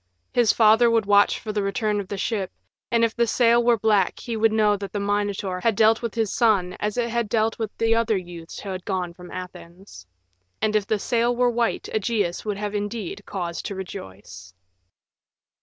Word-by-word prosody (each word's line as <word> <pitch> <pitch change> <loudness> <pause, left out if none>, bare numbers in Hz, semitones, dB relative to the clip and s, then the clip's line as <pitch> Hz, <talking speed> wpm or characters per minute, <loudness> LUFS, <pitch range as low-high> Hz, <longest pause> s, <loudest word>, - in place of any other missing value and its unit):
His 240 -4 +4
father 225 +1 +5
would 225 -2 +2
watch 205 0 +4
for 215 - -5
the 210 - 0
return 205 +1 -1
of 200 - -5
the 200 - -5
ship, 195 -2 -2 0.4
and 230 -1 +2
if 225 - -3
the 235 0 +2
sail 235 +1 +3
were 235 -1 +4
black 210 -3 +2
he 235 - -5
would 220 0 +3
know 215 -1 +3
that 200 -2 -6
the 205 - -3
Minotaur 200 -2 -1
had 225 +2 +1
dealt 220 +1 +4
with 235 -2 -4
his 225 -3 0
son 200 -7 +2
as 210 +2 -2
it 240 -1 +1
had 235 -2 -1
dealt 225 0 0
with 220 -2 -2
the 225 0 +2
other 230 -2 +2
youths 175 -2 -9
who 200 - -7
had 185 -1 -5
gone 180 -3 -3
from 180 0 -12
Athens. 180 - -10 0.5
And 215 0 0
if 205 -2 +1
the 215 - +1
sail 235 +3 0
were 245 0 +2
white 235 -1 -1
Ægeus 205 -4 -1
would 210 -2 -3
have 205 0 -4
indeed 205 -1 -4
cause 175 -3 -4
to 200 - -5
rejoice. 95 - -9
210 Hz, 205 wpm, -24 LUFS, 190-225 Hz, 0.5 s, father